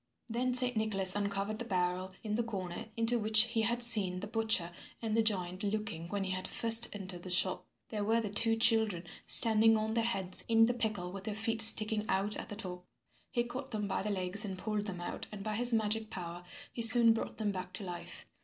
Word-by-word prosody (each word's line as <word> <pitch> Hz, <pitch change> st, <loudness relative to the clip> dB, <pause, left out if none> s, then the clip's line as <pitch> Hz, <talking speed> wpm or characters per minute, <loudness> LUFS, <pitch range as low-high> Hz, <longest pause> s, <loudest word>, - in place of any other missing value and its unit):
Then 245 Hz, +2 st, -3 dB
Saint 250 Hz, -1 st, +3 dB
Nicholas 200 Hz, -4 st, 0 dB
uncovered 200 Hz, +1 st, -4 dB
the -, -, -5 dB
barrel 185 Hz, -3 st, -3 dB
in 210 Hz, -2 st, -5 dB
the 230 Hz, -, -1 dB
corner 200 Hz, -2 st, -7 dB
into 230 Hz, +1 st, +1 dB
which 215 Hz, 0 st, +4 dB
he 230 Hz, -1 st, -3 dB
had 235 Hz, +2 st, +1 dB
seen 200 Hz, -6 st, +6 dB
the 200 Hz, -, -6 dB
butcher 220 Hz, -6 st, -1 dB, 0.3 s
and 220 Hz, -2 st, -4 dB
the 225 Hz, -, +2 dB
giant 185 Hz, -4 st, -1 dB
looking 205 Hz, -5 st, -5 dB
when 200 Hz, +2 st, -4 dB
he 190 Hz, -, -5 dB
had 185 Hz, 0 st, -6 dB
first 230 Hz, +1 st, +6 dB
entered 190 Hz, -3 st, -8 dB
the 185 Hz, -, -10 dB
shop. 185 Hz, +1 st, 0 dB, 0.2 s
There 210 Hz, -2 st, -5 dB
were 225 Hz, +3 st, 0 dB
the 210 Hz, -3 st, -5 dB
two 225 Hz, +2 st, +2 dB
children 220 Hz, -6 st, +1 dB, 0.2 s
standing 225 Hz, -1 st, +5 dB
on 215 Hz, 0 st, -4 dB
their 230 Hz, 0 st, -1 dB
heads 195 Hz, -5 st, -1 dB
in 225 Hz, 0 st, +3 dB
the 245 Hz, -, -2 dB
pickle 215 Hz, -7 st, -5 dB
with 195 Hz, 0 st, -10 dB
their 215 Hz, -, -5 dB
feet 225 Hz, +1 st, +2 dB
sticking 220 Hz, -1 st, +7 dB
out 200 Hz, +2 st, -1 dB
at -, -, -9 dB
the 205 Hz, -, -7 dB
top. 180 Hz, -4 st, -9 dB, 0.5 s
He 240 Hz, -, -2 dB
caught 255 Hz, +3 st, -9 dB
them 210 Hz, -4 st, -5 dB
by -, -, -3 dB
the 210 Hz, -, -5 dB
legs 190 Hz, +1 st, -2 dB
and 195 Hz, -3 st, -7 dB
pulled 210 Hz, +1 st, -5 dB
them 180 Hz, -3 st, -7 dB
out 175 Hz, -, -7 dB
and 205 Hz, -2 st, -9 dB
by 215 Hz, 0 st, -5 dB
his 245 Hz, +3 st, +2 dB
magic 220 Hz, -1 st, -1 dB
power 175 Hz, -2 st, -8 dB, 0.3 s
he 235 Hz, -, -6 dB
soon 230 Hz, 0 st, +4 dB
brought 225 Hz, -, -7 dB
them 215 Hz, -2 st, -3 dB
back 185 Hz, -1 st, -8 dB
to 210 Hz, -, -6 dB
life. 175 Hz, -2 st, -8 dB
215 Hz, 225 wpm, -30 LUFS, 190-225 Hz, 0.5 s, sticking